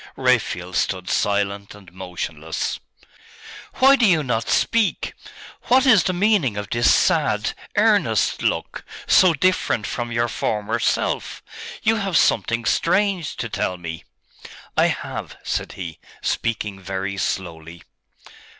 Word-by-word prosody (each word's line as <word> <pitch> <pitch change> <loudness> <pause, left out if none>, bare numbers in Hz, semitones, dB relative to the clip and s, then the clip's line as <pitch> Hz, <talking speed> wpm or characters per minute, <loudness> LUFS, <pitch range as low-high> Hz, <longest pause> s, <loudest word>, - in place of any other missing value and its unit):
Raphael 115 -8 0
stood 90 0 -1
silent 100 0 -1
and 95 -4 -16
motionless. 85 -4 -4 1.0
'Why 270 +1 +6
do 240 -5 +3
you 165 -5 +3
not 115 -4 -2
speak? 230 -3 +1 0.5
What 260 +2 +4
is 220 -9 +5
the - - +2
meaning 180 - +1
of 105 0 -5
this 120 0 +4
sad, - - +2 0.2
earnest - - +2
look, - - -2 0.2
so 180 -3 +5
different 185 -9 +1
from 120 +1 -4
your 120 0 +1
former 110 0 -2
self?.... - - -1 0.4
You 225 0 +3
have 195 -5 0
something 115 0 +2
strange 190 -2 +1
to 115 - -4
tell 90 -4 -2
me!' 80 -2 -7 0.7
'I - - +4
have,' - - -5
said - - -3
he, 85 -4 -7 0.2
speaking 105 -4 -2
very 95 +1 -4
slowly. 85 -3 -4
115 Hz, 125 wpm, -22 LUFS, -, 1.0 s, Why